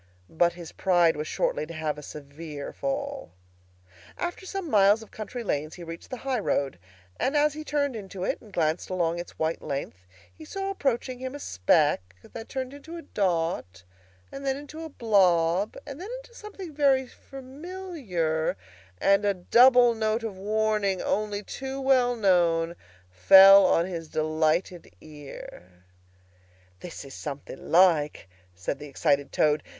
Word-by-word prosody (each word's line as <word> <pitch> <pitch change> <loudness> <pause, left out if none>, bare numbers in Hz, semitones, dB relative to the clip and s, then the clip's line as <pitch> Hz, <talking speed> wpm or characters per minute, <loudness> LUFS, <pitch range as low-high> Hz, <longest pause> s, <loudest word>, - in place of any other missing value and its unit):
But 170 +1 +2
his 170 -2 -10
pride 175 -3 +3
was 150 +1 -4
shortly 155 - -1
to 165 - -8
have 155 -2 -2
a - - -9
severe 145 0 -8
fall. 275 - -4 0.8
After 350 +2 -4
some 390 -3 -4
miles 210 -3 +4
of 220 - -17
country 220 +3 -6
lanes 155 -6 -2
he 175 - -9
reached 165 0 -9
the 255 - -5
high 260 -1 -2
road, 140 - -1 0.4
and 275 +4 +1
as 295 0 +3
he 310 +1 -7
turned 285 -3 -1
into 195 -3 -7
it - - -2
and 215 - -16
glanced 160 -2 -1
along 175 -2 0
its 175 - -9
white 160 +1 -1
length, 95 -10 -5 0.3
he 315 - -12
saw 390 +5 -4
approaching 260 -7 -2
him 260 +1 -5
a - - -7
speck 90 - +1
that 225 -1 -10
turned 260 0 -4
into 320 +4 -9
a 335 - -9
dot 165 - -2 0.5
and 275 - -8
then 270 -1 0
into 295 +3 -9
a 320 - -6
blob, 190 - +2
and 285 +2 -8
then 395 - -7
into 475 - -19
something 400 -7 -9
very 275 -2 +3
familiar; 265 - -4 0.4
and 200 +1 +3
a 200 -1 +2
double 245 +6 +6
note 220 0 -1
of 220 -4 -4
warning, 210 -1 0
only 210 0 -1
too 270 +5 -6
well 255 -2 +3
known, 170 -5 +2 0.4
fell 190 - +8
on 165 - +3
his 170 -3 -5
delighted 155 +3 -1
ear. 135 - -12 1.0
"This 170 - -8
is 135 - -11
something 140 -2 -8
like!" 165 - +4 0.3
said 90 +10 -4
the 150 - -8
excited 140 0 0
Toad. 150 0 +2
195 Hz, 155 wpm, -27 LUFS, 160-265 Hz, 1.0 s, fell